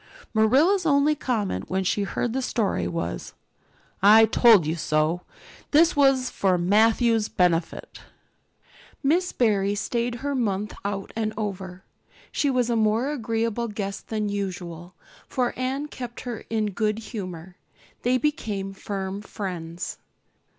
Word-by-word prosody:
Marilla's 275 - +4
only 290 -1 +3
comment 215 - -2
when 190 +1 0
she 200 +2 0
heard 220 +4 -2
the 265 - -1
story 210 - 0
was, 85 -7 -4 0.7
"I 215 +3 +8
told 220 -5 +6
you 160 +2 -1
so." 155 +1 0 0.5
This 325 +3 +5
was 270 -3 +3
for 185 -2 +1
Matthew's 220 +4 +3
benefit. 170 -2 0 1.0
Miss 345 +6 +2
Barry 205 -4 +1
stayed 235 +3 -1
her 285 - 0
month 210 -5 -1
out 200 -1 -4
and 215 -1 -2
over. 190 -3 -5 0.5
She 285 - +1
was 250 -3 +1
a - - +2
more 225 +5 +2
agreeable 230 -3 -1
guest 200 -2 -5
than 215 -2 -2
usual, 180 -3 -5 0.3
for 250 -2 -1
Anne 265 +3 -2
kept 245 -4 -7
her 240 -3 -6
in 215 -2 0
good 215 +1 0
humor. 185 -5 -7 0.4
They 250 +1 +2
became 215 -9 -2
firm 195 0 -5
friends. 180 -4 -6
215 Hz, 130 wpm, -25 LUFS, 190-245 Hz, 1.0 s, I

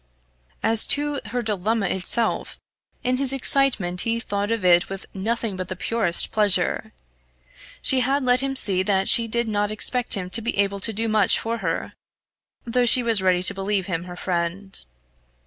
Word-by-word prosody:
As 225 0 +5
to 290 0 +1
her 245 +3 -3
dilemma 215 0 -1
itself, 205 +6 -2 0.5
in 250 +1 0
his 270 -1 0
excitement 245 -9 +2
he 230 0 -1
thought 205 -2 -3
of 225 -4 -2
it 175 -1 +4
with 195 0 -6
nothing 220 +1 -3
but 185 -1 -5
the 185 - -5
purest 200 -2 -2
pleasure! 205 -3 +1 0.9
She 265 - +3
had 270 +2 0
let 250 0 +3
him 270 0 -3
see 190 -7 +3
that 190 0 0
she 230 -1 +4
did 235 +1 -1
not 205 -1 -1
expect 240 +3 0
him 185 -2 -5
to 230 - -2
be 230 -1 -3
able 200 0 0
to 225 - -1
do 225 +2 -2
much 215 -3 +2
for 230 +1 -4
her, - - -3 0.7
though 245 +1 +1
she 250 +1 +5
was 225 -4 +3
ready 180 -1 +2
to - - +6
believe 195 0 -2
him 170 -3 -4
her 180 -1 -9
friend. 180 +2 -4
215 Hz, 180 wpm, -22 LUFS, 190-235 Hz, 0.9 s, to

